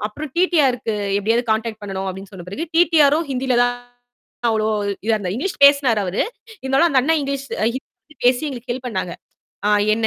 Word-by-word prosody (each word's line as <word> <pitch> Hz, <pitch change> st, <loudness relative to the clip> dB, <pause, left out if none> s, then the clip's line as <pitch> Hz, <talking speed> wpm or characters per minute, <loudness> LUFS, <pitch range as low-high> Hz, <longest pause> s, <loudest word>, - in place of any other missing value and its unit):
அப்புறம் 295 Hz, +8 st, -7 dB
டி-டி-ஆர் 325 Hz, -8 st, +3 dB
க்கு 225 Hz, -, -2 dB, 0.2 s
எப்பிடியாவது 225 Hz, +4 st, +1 dB
கான்டாக்ட் 220 Hz, 0 st, -1 dB
பண்ணணும் 195 Hz, -1 st, -4 dB
அப்பிடின்னு 190 Hz, +2 st, -8 dB
சொன்ன 180 Hz, -2 st, -10 dB
பிறகு, 240 Hz, -, -4 dB
டி-டி-ஆரும் 320 Hz, -2 st, +4 dB
ஹிந்தியில 260 Hz, -1 st, 0 dB
தான் 245 Hz, 0 st, +1 dB, 0.8 s
அவ்ளோ 215 Hz, -1 st, 0 dB, 0.4 s
இதா 225 Hz, 0 st, +2 dB
இருந்தார். 190 Hz, -3 st, -3 dB
இங்கிலீஷ் 295 Hz, +3 st, -3 dB
பேசினாரு 280 Hz, -6 st, +5 dB
அவரு. 180 Hz, +1 st, 0 dB, 0.4 s
இருந்தாலும் 270 Hz, +6 st, +3 dB
அந்த 270 Hz, -4 st, +3 dB
அண்ணன் 320 Hz, +5 st, +2 dB
இங்கிலீஷ் 275 Hz, -1 st, -3 dB, 0.2 s
அ -, -, +2 dB
ஹிந்தி 290 Hz, +3 st, -11 dB
பேசி 250 Hz, +2 st, +4 dB
எங்களுக்கு 250 Hz, -2 st, -7 dB
ஹெல்ப் 255 Hz, +1 st, -6 dB
பண்ணாங்க. 185 Hz, -6 st, -3 dB, 0.8 s
என்ன 225 Hz, 0 st, 0 dB
250 Hz, 175 wpm, -20 LUFS, 215-280 Hz, 0.8 s, பேசினாரு